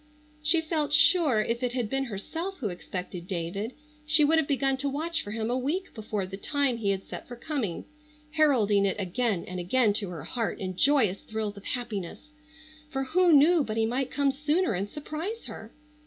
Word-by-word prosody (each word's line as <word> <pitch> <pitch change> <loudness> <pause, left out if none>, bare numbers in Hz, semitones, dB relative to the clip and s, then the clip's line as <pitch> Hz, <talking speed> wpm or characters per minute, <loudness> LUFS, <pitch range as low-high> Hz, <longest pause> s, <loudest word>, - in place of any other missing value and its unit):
She 320 +2 +4
felt 310 -2 -1
sure 295 - +6
if 235 +2 -2
it 250 -1 -1
had 245 -3 -1
been 270 +4 -1
herself 325 - -5
who 220 -10 -2
expected 180 0 -6
David 195 +6 -3 0.3
she 300 0 +5
would 320 +2 +4
have 310 - 0
begun 270 -1 +1
to 280 +1 -1
watch 320 +5 -1
for - - -8
him 220 +2 -2
a 250 - +1
week 320 +9 -2
before 215 -3 -3
the 190 +1 -7
time 280 +2 +1
he 210 -3 -1
had 195 -1 0
set - - -8
for 245 - -8
coming, 240 - -3 0.5
heralding 245 -11 +3
it 195 - 0
again 200 0 -1
and 185 0 -5
again 210 +5 +2
to 200 - -4
her 175 -2 -7
heart 230 -2 -2
in 185 -1 -4
joyous 230 -5 +3
thrills 220 -2 -4
of 200 - -12
happiness, 240 - -4 0.6
for 270 -3 -2
who 350 +6 +3
knew 310 +2 +6
but 215 -3 -4
he 225 - +3
might 255 +3 -1
come 280 -1 +1
sooner 300 - +1
and 195 +2 -2
surprise 320 - -5
her? - - -8
250 Hz, 200 wpm, -28 LUFS, 205-300 Hz, 0.6 s, sure